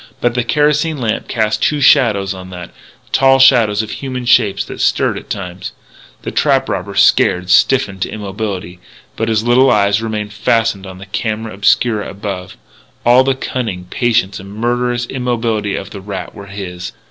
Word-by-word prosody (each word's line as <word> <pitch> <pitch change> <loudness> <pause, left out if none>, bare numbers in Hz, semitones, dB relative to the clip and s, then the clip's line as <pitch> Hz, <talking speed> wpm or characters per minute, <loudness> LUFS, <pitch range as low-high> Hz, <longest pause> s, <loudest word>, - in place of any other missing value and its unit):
But 120 - +1
the 125 0 0
kerosene 150 +4 +1
lamp 115 -3 -2
cast 110 -1 -1
two 150 - +1
shadows 110 -9 +3
on 95 -1 -10
that 90 -2 -9 0.4
tall 135 0 +4
shadows 115 -5 +4
of 110 - -7
human 130 -2 -5
shapes 115 -4 +3
that - - -7
stirred - - +1
at - - -9
times. 90 -1 -6 0.5
The - - -4
trap - - +2
robber, - - -4
scared, 90 0 +3
stiffened 100 -2 +3
to - - -1
immobility, 100 -3 -5 0.4
but 115 0 -2
his 110 -1 +1
little 125 +3 +4
eyes 100 0 +3
remained 105 -2 -4
fastened 110 -1 0
on 95 -1 -9
the 95 - -10
camera 110 +2 -3
obscura 105 +2 +1
above. 100 -2 -6 0.5
All 125 +2 +6
the 135 0 +1
cunning, 115 -9 -4
patience, 115 -5 0
and 95 +1 -11
murderous 120 +1 -1
immobility 115 -5 -2
of 100 +2 -6
the 100 - -8
rat 95 -1 -6
were 100 - -11
his. 90 -3 -7
110 Hz, 170 wpm, -16 LUFS, 100-120 Hz, 0.5 s, All